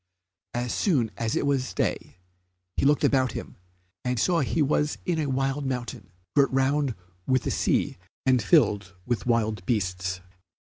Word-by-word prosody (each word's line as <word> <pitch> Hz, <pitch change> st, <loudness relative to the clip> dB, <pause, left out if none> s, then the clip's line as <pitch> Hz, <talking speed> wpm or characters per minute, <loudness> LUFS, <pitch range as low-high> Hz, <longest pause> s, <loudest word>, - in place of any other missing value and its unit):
As 120 Hz, 0 st, -1 dB
soon 135 Hz, -, +1 dB
as 115 Hz, -1 st, -1 dB
it -, -, 0 dB
was 135 Hz, -2 st, 0 dB
day -, -, -2 dB, 0.6 s
he -, -, +1 dB
looked 145 Hz, 0 st, +3 dB
about 130 Hz, -3 st, +3 dB
him, -, -, -7 dB, 0.5 s
and 125 Hz, -2 st, -1 dB
saw 175 Hz, -, +2 dB
he 150 Hz, +2 st, +1 dB
was 150 Hz, +1 st, +1 dB
in 170 Hz, -3 st, 0 dB
a 150 Hz, -, 0 dB
wild 135 Hz, +2 st, 0 dB
mountain, 125 Hz, -4 st, -4 dB, 0.3 s
girt 140 Hz, -1 st, +5 dB
round 135 Hz, -1 st, +1 dB, 0.3 s
with 130 Hz, -1 st, +2 dB
the -, -, -1 dB
sea -, -, +1 dB, 0.3 s
and 130 Hz, -2 st, +4 dB
filled 105 Hz, -, +3 dB
with 120 Hz, 0 st, -2 dB
wild 110 Hz, -4 st, +1 dB
beasts. 90 Hz, -4 st, -1 dB
130 Hz, 155 wpm, -26 LUFS, 110-140 Hz, 0.6 s, girt